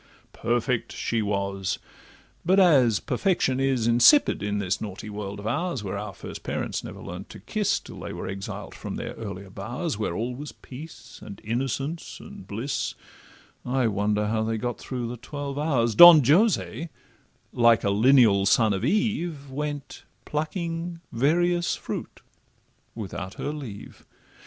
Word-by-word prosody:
Perfect 120 +1 -1
she 115 -1 -1
was, 100 -1 -1 0.7
but 190 +3 +4
as 135 - +5
perfection 135 -2 0
is 135 -4 +1
Insipid 120 - +5
in 105 0 -1
this 100 -1 -1
naughty 105 0 -6
world 100 -1 -5
of 100 - -9
ours, 140 +1 -1
Where 100 0 -4
our 105 0 -4
first - - -8
parents - - -3
never - - -8
learn'd 90 +3 -8
to - - -10
kiss 210 -3 0
Till - - -11
they - - -6
were - - -6
exiled 95 0 -6
from - - -6
their - - -5
earlier 100 -3 -7
bowers, 120 - -4
Where 105 -5 -1
all 120 +5 -2
was 145 +4 -7
peace, 150 +5 -11
and 100 - -9
innocence, 135 +8 -3
and 205 -1 -11
bliss 130 +6 -3 0.7
(I 130 0 0
wonder 105 0 +1
how 110 +1 0
they 110 0 -1
got 115 0 -3
through 125 -3 -4
the 120 +1 -6
twelve 140 +3 -5
hours), 125 -7 +1
Don 165 +1 +10
Jose, 155 - +2 0.6
like 115 -1 +4
a 100 - +2
lineal 110 -3 +5
son 110 0 +4
of 95 - -3
Eve, 170 - -1
Went 145 0 -5 0.2
plucking 165 +2 -3
various 175 +7 +2
fruit - - -6 0.7
without 95 -3 -6
her 145 - -3
leave. 125 -10 -9
120 Hz, 150 wpm, -26 LUFS, 105-150 Hz, 0.7 s, Don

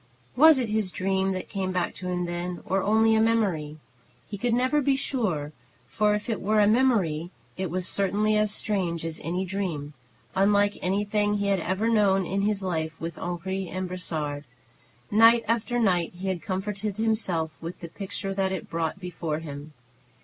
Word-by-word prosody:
Was 310 +3 +8
it 245 -4 -1
his 215 -2 0
dream 190 0 0
that 185 - -5
came 190 -2 -2
back 180 -1 -1
to 185 - -6
him 180 -1 -1
then, 175 +1 -4
or 195 +1 +1
only 220 +3 +4
a 220 - +4
memory? 190 -10 +1 0.5
He 205 - -6
could 235 +3 0
never 255 +4 +2
be 275 0 +2
sure, 195 - -1 0.3
for 210 0 +1
if 210 - -4
it 225 -3 -2
were 215 +2 +2
a 205 - +6
memory, 205 -9 +2 0.3
it 190 -2 -3
was 180 +2 -2
certainly 205 +2 +1
as 210 -1 +2
strange 180 -7 -1
as 165 -1 -4
any 180 +4 -1
dream, 175 -6 -3 0.4
unlike 205 +1 +3
anything 205 +2 +1
he 200 0 0
had 195 -1 +2
ever 190 +6 -1
known 200 -4 +3
in 195 +3 -1
his 205 -1 0
life 160 -3 -2
with 165 +1 -5
Henri 185 +2 -3
and 185 0 -3
Brossard. 155 -5 -4 0.7
Night 230 +2 +6
after 235 +1 0
night 180 -8 +2
he 190 +2 -4
had 180 -3 -2
comforted 200 +1 -3
himself 195 -8 -1
with 165 +2 -6
the 170 - -7
picture 195 +2 -5
that 190 -1 0
it 190 - -5
brought 165 +2 -2
before 170 -4 -3
him. 150 -1 -8
195 Hz, 180 wpm, -26 LUFS, 175-215 Hz, 0.7 s, Was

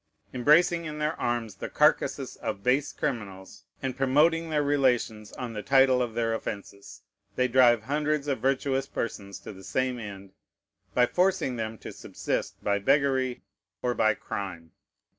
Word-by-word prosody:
Embracing 165 +6 +4
in 150 -1 -5
their 150 +1 0
arms 115 -4 -2
the - - -5
carcasses - - +2
of 100 - -4
base 135 +4 +2
criminals, 100 -6 -5 0.2
and 130 -2 -2
promoting 155 +5 +3
their 150 -2 +1
relations 125 -7 +1
on 125 -3 -5
the 105 - -4
title 135 0 +4
of 120 -2 -2
their 115 -1 0
offences, 100 -2 -7 0.3
they 125 - +2
drive 120 -3 +5
hundreds 150 +2 -1
of 140 -4 0
virtuous 135 +1 0
persons 100 -6 -5
to - - -9
the 95 0 -13
same 130 +5 -1
end, 100 -3 -8 0.6
by 125 - +5
forcing 180 -4 +1
them 110 -1 -4
to - - -8
subsist - - -4
by 100 0 +1
beggary 130 +2 +1 0.4
or 125 -1 +1
by 110 -3 +2
crime. 90 -5 -6
125 Hz, 155 wpm, -27 LUFS, 105-140 Hz, 0.6 s, drive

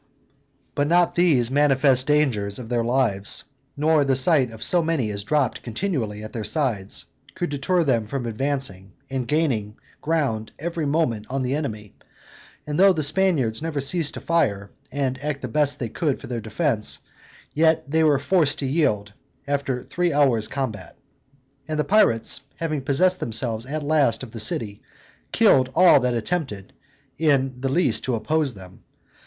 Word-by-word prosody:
But 145 - 0
not 175 +2 +3
these 145 -9 +2
manifest 135 -2 +3
dangers 125 -10 +1
of 120 -3 -9
their 120 -1 0
lives, 115 -5 +1 0.3
nor 155 0 +3
the 135 -1 +1
sight 135 -1 +4
of 110 -1 -7
so 175 - +5
many 160 -9 -1
as 100 -1 -5
dropped 130 0 0
continually 115 - -3
at 110 - -9
their 115 - -4
sides, 105 -5 -1 0.3
could 175 -3 -3
deter 170 +5 0
them 115 -7 0
from 130 +1 -4
advancing, 115 -6 -3 0.2
and 130 -3 -3
gaining 120 -9 -1 0.3
ground 140 -9 -1
every 165 -1 -3
moment 140 -8 -1
on 135 0 -2
the 125 +1 -1
enemy; 110 -9 -4 0.7
and 150 +2 -3
though 195 0 +6
the 155 -3 -1
Spaniards 150 -8 +2
never 160 -2 -3
ceased 150 +3 0
to - - -7
fire, 100 -13 0 0.2
and 135 -1 -2
act 150 -2 -3
the - - -2
best 145 +3 0
they 120 - -4
could 145 +3 -2
for - - -10
their 120 -2 -4
defense, 110 0 -1 0.6
yet 160 +1 +3
they 160 +3 +1
were 150 -3 +4
forced 150 +1 +1
to 140 - -3
yield, 110 -9 0 0.3
after 140 -3 -2
three 175 -1 -1
hours' 135 -7 +2
combat. 110 - -5 0.7
And 155 -1 -3
the 150 - +1
pirates 150 - +4
having 155 -3 -3
possessed 180 +8 +2
themselves 115 0 -2
at 150 +2 -4
last 145 -6 +2
of 125 - -9
the 115 - -8
city, 105 -1 -2 0.5
killed 130 -1 +4
all 180 -5 +6
that 125 -1 0
attempted 115 - -3 0.5
in 135 -5 +1
the 135 - -1
least 125 -7 +1
to 125 - 0
oppose 145 +3 0
them. 95 -1 -14
135 Hz, 165 wpm, -23 LUFS, 115-155 Hz, 0.7 s, though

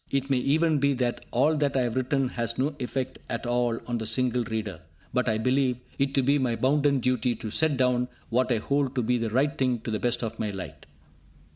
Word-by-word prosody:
It 135 0 -1
may 130 - +3
even 155 +3 +2
be 140 +1 +3
that 125 -1 -1
all 145 +6 +3
that 145 -2 +1
I - - +3
have 120 -2 -1
written 130 +1 +1
has 115 -2 -2
no 145 +3 0
effect 130 +1 -3
at 115 +2 -3
all 120 -1 +1
on 120 -2 -2
a 110 - -3
single 125 +2 +1
reader, 105 -7 -4 0.3
but 125 -1 +2
I 110 - +1
believe 130 +2 +1 0.2
it 135 0 +1
to 135 - +3
be 140 +3 +3
my 125 -3 0
bounden 140 +1 +2
duty 125 -1 +1
to 110 - -6
set 155 +2 +2
down 125 -1 +2 0.2
what 125 +2 +1
I 120 - +3
hold 140 +4 0
to 125 - +1
be 120 +2 +1
the 115 -1 -1
right 135 +6 +1
thing 130 -2 +1
to 115 - -4
the 110 - -1
best 120 0 0
of 115 - -4
my 110 - -1
light. 95 -2 -8
125 Hz, 235 wpm, -27 LUFS, 120-135 Hz, 0.3 s, may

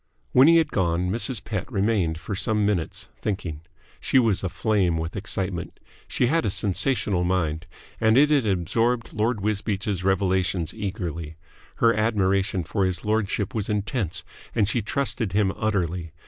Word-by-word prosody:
When 130 +3 +7
he 165 0 +7
had 165 - +2
gone, 90 -1 0
Mrs. 120 +1 -1
Pett 110 +3 -4
remained 100 -6 +1
for 100 - -6
some 105 +2 +1
minutes, 95 -6 -1
thinking. 90 -7 -3 0.4
She - - +1
was 115 -7 +3
aflame 95 -1 +1
with 80 +1 -4
excitement. 95 -3 -3 0.3
She - - +1
had 160 +6 +2
a - - +1
sensational 100 -1 0
mind, 85 -2 -1 0.3
and 110 +2 +4
it 150 +2 +5
had 140 -7 +3
absorbed 115 +6 0
Lord 110 0 0
Wisbeach's 100 -2 -1
revelations 95 -3 +1
eagerly. 90 -7 -4 0.4
Her 115 0 +4
admiration 100 -4 +1
for 100 +4 -1
his 95 -1 -1
lordship 105 -2 0
was 110 -2 -2
intense, 105 - -2 0.3
and 105 -3 +3
she 115 +3 0
trusted 115 -3 -2
him 100 -2 +2
utterly. 90 -6 -1
100 Hz, 150 wpm, -25 LUFS, 90-110 Hz, 0.4 s, When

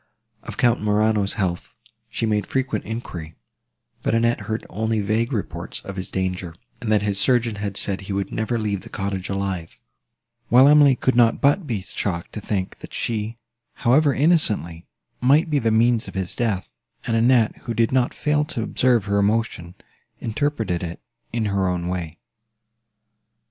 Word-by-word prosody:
Of - - -9
Count 120 0 +3
Morano's 105 -1 +2
health 90 -5 -3 0.3
she - - -2
made 105 -2 0
frequent 130 -5 -1
enquiry; 90 -8 -6 0.7
but - - 0
Annette 115 +1 +2
heard 110 +1 -2
only 110 +2 -1
vague 110 +4 0
reports 110 -6 -3
of 100 - -8
his 95 0 -5
danger, 90 -3 -3 0.3
and 110 - -2
that 105 -1 +3
his 100 -1 +1
surgeon 120 -2 +2
had 100 -1 -3
said 100 -1 +1
he 95 - -7
would 100 0 -2
never 110 +2 -1
leave 105 -3 -2
the - - -11
cottage 95 -1 -3
alive; 95 -4 -3 0.7
while 130 +3 +7
Emily 145 -2 +7
could 130 0 0
not 115 -2 +4
but 145 +5 +2
be 110 -7 -2
shocked 90 -3 -4
to 105 - -5
think, 95 -3 -3
that - - -10
she, 115 0 -2 0.4
however 140 +5 +3
innocently, 110 - +1 0.3
might 145 +6 +4
be 145 - +3
the 115 -3 +1
means 115 +1 +3
of - - -9
his 95 -2 -3
death; 110 -6 -2 0.3
and 115 - 0
Annette, 115 -1 +4
who 115 - -2
did 115 0 +2
not 130 -1 +2
fail 150 0 +1
to 150 -8 -4
observe 120 -3 +2
her 100 0 +1
emotion, 100 -4 0 0.4
interpreted 110 -7 -1
it 85 -1 -5 0.3
in 115 -1 -1
her 100 -2 +1
own 90 -1 -1
way. 85 -3 -4
110 Hz, 170 wpm, -23 LUFS, 95-120 Hz, 0.7 s, while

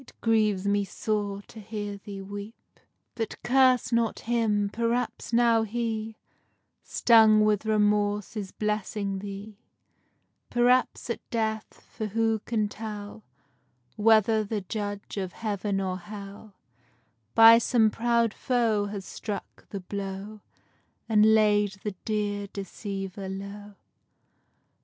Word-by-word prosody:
_ 205 -1 -2 0.6
But 225 -2 -4
curse 255 -1 +4
not 230 -1 +1
him; 215 -3 +1
perhaps 235 +1 -1
now 230 -1 +4
he, 220 0 -3 0.6
Stung 220 -2 +5
with 215 0 +1
remorse, 210 -1 +1
is 200 -3 -5
blessing 210 -2 -2
thee: 200 +1 -8 0.9
Perhaps 245 0 +2
at - - -3
death; 220 -2 -3
for 220 -2 -5
who 225 +1 +1
can 215 -3 0
tell 210 0 -7 0.7
Whether 220 0 +4
the 210 0 -3
judge 205 +1 -5
of 190 -2 -3
heaven 205 -2 -2
or 185 -1 -2
hell, 200 +2 -10 0.8
By 225 +1 +9
some 225 -2 +3
proud 235 -1 +1
foe 225 -5 +1
has 200 -2 -6
struck 210 -2 -7
the 200 - -5
blow, 200 +2 -6 0.7
And 220 0 +5
laid 210 -2 +3
the 210 - -3
dear 205 -2 -1
deceiver 195 -1 -6
low? 200 +1 -8
210 Hz, 100 wpm, -27 LUFS, 200-225 Hz, 0.9 s, By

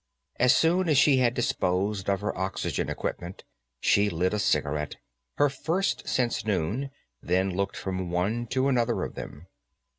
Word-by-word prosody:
As 125 0 +5
soon 175 +2 +2
as 150 - +4
she 140 -1 +5
had 125 -1 +2
disposed 100 -3 0
of 100 0 +1
her 105 - -2
oxygen 95 +1 -2
equipment, 90 +2 -5 0.4
she 100 +8 +3
lit 90 +2 0
a 105 - 0
cigarette, 75 -6 0 0.4
her 145 - +5
first 165 +8 -1
since 120 -3 0
noon, 110 - -1 0.3
then 95 +2 +1
looked 100 +1 -2
from 95 -2 -3
one 105 +7 -1
to 130 +3 +1
another 120 -3 +1
of - - -5
them. 75 +4 -9
105 Hz, 155 wpm, -27 LUFS, 95-130 Hz, 0.4 s, As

